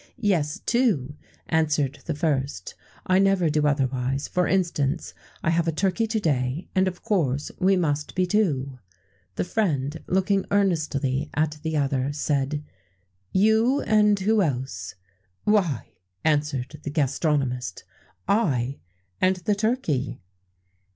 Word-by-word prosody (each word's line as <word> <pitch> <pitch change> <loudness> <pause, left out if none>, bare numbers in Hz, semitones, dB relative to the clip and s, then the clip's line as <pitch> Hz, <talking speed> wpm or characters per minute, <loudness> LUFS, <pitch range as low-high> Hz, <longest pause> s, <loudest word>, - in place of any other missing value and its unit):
"Yes, 160 -7 +1
two," 205 - +1 0.3
answered 150 -3 +1
the 160 - -1
first; 140 - -1 0.3
"I 185 0 +3
never 195 -4 +3
do 150 0 +2
otherwise: 135 -1 0
for 180 0 +1
instance, 170 -5 0 0.3
I 170 - +2
have 165 0 +1
a - - +3
turkey 195 +7 0
to 220 0 0
day, 140 -3 -1
and 190 0 +3
of 180 -1 -5
course 150 - 0
we 190 +1 +4
must 150 -5 -1
be 185 - +2
two." 145 -10 0 0.6
The - - 0
friend, 160 -7 -1
looking 190 +1 +1
earnestly 155 -8 +1
at 155 0 0
the 160 -1 -1
other, 135 -1 0
said: 145 0 -1 0.7
"You, 220 +7 +3
and 210 -1 +3
who 215 +2 +3
else?" 125 - -3 0.5
"Why," 190 - +1 0.3
answered 150 -2 0
the - - -5
gastronomist, 135 - -1 0.4
"I 140 - +1 0.4
and 185 +1 +4
the 185 +3 0
turkey." 185 - -1
155 Hz, 125 wpm, -25 LUFS, 140-190 Hz, 0.7 s, we